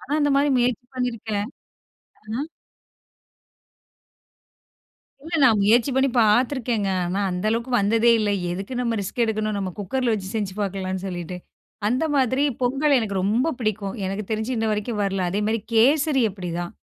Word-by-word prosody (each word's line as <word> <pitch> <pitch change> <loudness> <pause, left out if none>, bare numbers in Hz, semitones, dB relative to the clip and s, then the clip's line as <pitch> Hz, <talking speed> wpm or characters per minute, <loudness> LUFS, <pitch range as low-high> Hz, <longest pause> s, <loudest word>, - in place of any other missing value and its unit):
நானும் 295 +3 -2
அந்த 290 -1 +2
மாரி 285 +1 +3
முயற்சி 245 0 +1
பண்ணிருக்கேன். 225 -4 -2 0.8
ஆ - - -14 2.9
இல்ல, 325 +4 -7
நான் 225 -5 +5
முயற்சி 235 +6 +4
பண்ணி 265 +1 +3
பார்த்துருக்கேங்க. 230 -1 +2 0.2
ஆனா 190 +3 -1
அந்த 180 +2 -3
அளவுக்கு 235 +3 -2
வந்ததே 225 +4 +3
இல்ல. 210 -1 +1 0.2
எதுக்கு 195 +7 -5
நம்ப 235 -2 0
ரிஸ்க் 200 +5 -2
எடுக்கணும்? 215 -1 -1
நம்ப 190 -2 -3
குக்கர்ல 235 +4 -1
வச்சு 190 -3 -5
செஞ்சு 205 -3 -2
பார்க்கலாம்னு 190 -1 -3
சொல்லிட்டு, 175 -1 -5 0.5
அந்த 255 +7 +1
மாதிரி 260 0 +2 0.2
பொங்கல் 275 +3 +3
எனக்கு 210 -4 -2
ரொம்ப 225 +9 +1
பிடிக்கும். 215 -4 -2
எனக்கு 195 +2 -3
தெரிஞ்சு, 220 +2 -2
இன்ன 225 - 0
வரைக்கும் 210 +1 -2
வரல. 195 -1 -1
அதேமாதிரி, 210 +4 0
கேசரி 275 +4 +4
அப்படிதான். 175 -2 -5
220 Hz, 140 wpm, -23 LUFS, 200-250 Hz, 2.9 s, நான்